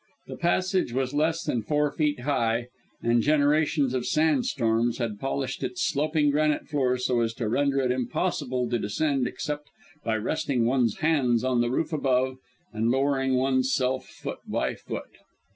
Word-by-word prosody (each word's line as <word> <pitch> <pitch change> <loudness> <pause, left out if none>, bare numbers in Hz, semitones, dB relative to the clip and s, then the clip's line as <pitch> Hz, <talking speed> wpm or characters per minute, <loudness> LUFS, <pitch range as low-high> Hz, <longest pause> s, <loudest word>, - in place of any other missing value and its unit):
The - - -7
passage 185 -4 +1
was 130 +1 -1
less 160 +3 +1
than 120 - -1
four 150 +5 +1
feet 150 -3 0
high, 120 -3 0 0.3
and 120 0 +3
generations 145 -1 +2
of 125 -2 -1
sand 160 +11 +2
storms 115 - +1
had 115 -4 -3
polished 135 0 -3
its 125 -1 -2
sloping 150 0 +1
granite 150 0 +1
floor 130 -4 +1
so 125 -1 0
as 115 -1 0
to 115 -2 -2
render 140 +4 +1
it 130 -1 +1
impossible 130 0 -1
to 120 - +1
descend 135 +5 0
except 150 0 -4 0.4
by 115 - 0
resting 135 +1 0
one's 120 -3 +2
hands 125 -7 +2
on 130 -2 +2
the 120 - +1
roof 155 +5 -1
above 130 -3 +1 0.4
and 110 +1 0
lowering 135 0 +1
one's 130 0 +2
self 130 0 0
foot - - -7
by - - -1
foot. - - -7
130 Hz, 165 wpm, -26 LUFS, 120-150 Hz, 0.4 s, and